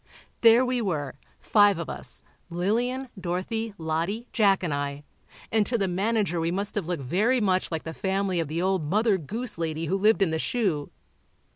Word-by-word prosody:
There 230 +2 +7
we 250 -1 0
were, 155 -9 -2 0.3
five 205 -3 +4
of 170 - -4
us—Lillian, 235 +9 -3
Dorothy, 195 +5 -3
Lottie, 165 +8 -2
Jack 200 -4 +3
and 165 -5 -1
I—and 145 +9 -3
to 235 - 0
the 195 -3 0
manager 195 -1 0
we 165 0 0
must 200 +4 -2
have 200 -6 -2
looked 175 -6 -2
very 215 - +2
much 185 -4 +1
like 160 -2 -3
the 160 - -6
family 190 0 -1
of 165 - -1
the 165 +4 -2
old 190 -3 +1
Mother 210 +1 +2
Goose 220 - -4
lady 160 0 -2
who 185 - 0
lived 215 0 +4
in 170 - 0
the 160 - -1
shoe. 180 -10 -1
190 Hz, 175 wpm, -26 LUFS, 165-220 Hz, 0.3 s, There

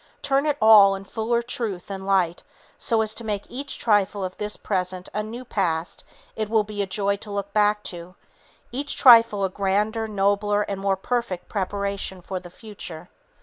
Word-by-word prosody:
Turn 280 +1 +1
it 295 -1 +1
all 210 -3 +7
in 195 - -8
fuller 230 +4 -1
truth 230 -7 -4
and 190 0 -6
light 180 -3 +1 0.4
so 230 -3 +1
as 215 0 -3
to 235 - -7
make 210 -2 -2
each 275 +3 -5
trifle 205 -2 +1
of 185 0 -4
this 210 0 -3
present 185 -2 -3
a 210 - -1
new 230 +4 -7
past 170 -6 -2 0.3
it 215 -1 -3
will 220 -1 +3
be 205 -1 -3
joy 200 +1 0
to 210 - -10
look 200 0 -4
back 210 0 +2
to; 175 +1 -10 0.6
each 280 +3 -2
trifle 230 -5 +7
a - - -1
grander, 205 +4 0
nobler, 205 0 +1
and 200 -1 -5
more 195 -1 +1
perfect 235 -4 -3
preparation 200 -1 -3
for 185 +1 -5
the 180 -1 -12
future. 180 -4 -9
205 Hz, 180 wpm, -24 LUFS, 190-220 Hz, 0.6 s, all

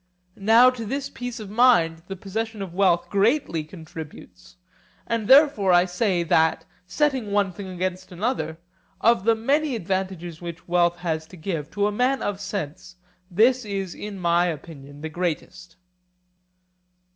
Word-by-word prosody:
Now 225 +5 +6
to 245 -2 -7
this 270 +6 -4
peace 245 0 -6
of 205 -2 -8
mind 190 -9 +4
the 195 - -5
possession 215 +2 -4
of 180 -3 -8
wealth 180 -2 +2
greatly 200 - +1
contributes; 155 - -11 0.5
and 230 -3 -2
therefore 265 - +6
I 175 +1 +5
say, 180 -1 0
that, 160 -1 +2 0.2
setting 260 -1 0
one 200 -2 +2
thing 190 +2 -8
against 185 +1 -4
another, 175 -5 -2 0.4
of 230 -4 +3
the 230 0 +4
many 275 +5 +1
advantages 185 -4 -3
which 170 -1 -8
wealth 175 0 +2
has 160 -3 -3
to 185 - -13
give, 160 -3 -4
to 205 0 +1
a 210 - +1
man 255 +5 +1
of 205 -1 -3
sense 185 -3 -5 0.3
this 240 +7 +3
is 195 -3 -4
in 205 -1 -7
my 175 0 +2
opinion 145 -3 -8
the 160 - -4
greatest. 175 +1 -4
190 Hz, 150 wpm, -24 LUFS, 170-225 Hz, 0.5 s, Now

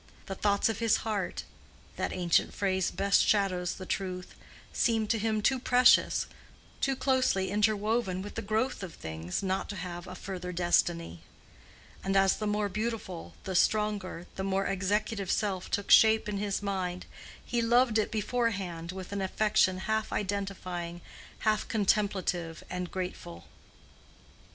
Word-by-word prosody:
The 195 - -4
thoughts 200 +1 +2
of 225 -2 -2
his 230 -2 +3
heart 210 -4 -2 0.5
(that - - -2
ancient 175 -2 +1
phrase 190 -2 +1
best 200 0 +3
shadows 185 -4 +1
the 185 - -8
truth) 185 -1 -4 0.4
seemed 225 -3 +1
to 225 - +1
him 215 0 0
too 265 +3 +3
precious, 250 0 +5 0.5
too 270 0 +1
closely 255 -9 +1
interwoven 210 -2 +1
with 205 - -8
the 225 - -3
growth 220 +4 -1
of 185 -4 -7
things 80 - -4
not 190 0 -1
to 205 - -4
have 175 -1 -6
a 185 - -7
further 180 -1 -6
destiny. 170 - +1 0.8
And 195 0 +1
as 195 0 +4
the 215 - -2
more 210 0 +1
beautiful, 215 -4 -4
the 190 - -4
stronger, 205 -3 +1
the 190 - -2
more 195 0 0
executive 195 +1 -1
self 195 -3 -1
took 200 - -1
shape 220 0 +7
in 205 -1 -2
his 205 0 -2
mind, 185 -3 -2 0.4
he 240 -1 0
loved 235 -1 +4
it 215 - 0
beforehand 200 -7 -2
with 185 0 -8
an 200 -1 -2
affection 190 -1 +2
half 220 0 -1
identifying, 185 -4 -3 0.4
half 215 -1 +1
contemplative 195 -6 0
and 180 -1 -3
grateful. 85 - -6
195 Hz, 145 wpm, -30 LUFS, 185-215 Hz, 0.8 s, shape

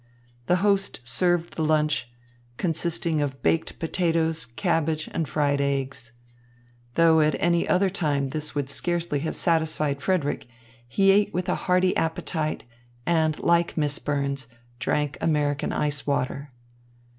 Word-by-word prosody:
The 180 - +4
host 200 -8 +1
served 175 +6 +2
the 160 - -2
lunch, 150 -5 +1 0.5
consisting 165 -2 0
of 135 -2 -4
baked 165 - 0
potatoes, 165 -1 0
cabbage 160 - -1
and 160 - -1
fried 145 -2 +1
eggs. 135 -4 -2 0.8
Though 165 -1 +5
at 150 -2 +2
any 170 0 +1
other 190 +1 +3
time 145 -7 0
this 150 +1 -2
would 145 -2 -1
scarcely 170 +1 0
have 160 +3 -3
satisfied 155 -4 +1
Frederick, 160 -7 -1 0.4
he 195 +11 +4
ate 205 +1 +3
with 180 0 -1
a - - +1 0.2
hearty 185 0 +3
appetite 160 -1 -1 0.4
and, 160 -2 +1
like 170 0 +2
Miss 145 -2 0
Burns, 140 -3 -2 0.3
drank 145 +1 -1
American 145 -2 0
ice 145 -2 -2
water. 140 0 -2
155 Hz, 135 wpm, -25 LUFS, 145-170 Hz, 0.8 s, Though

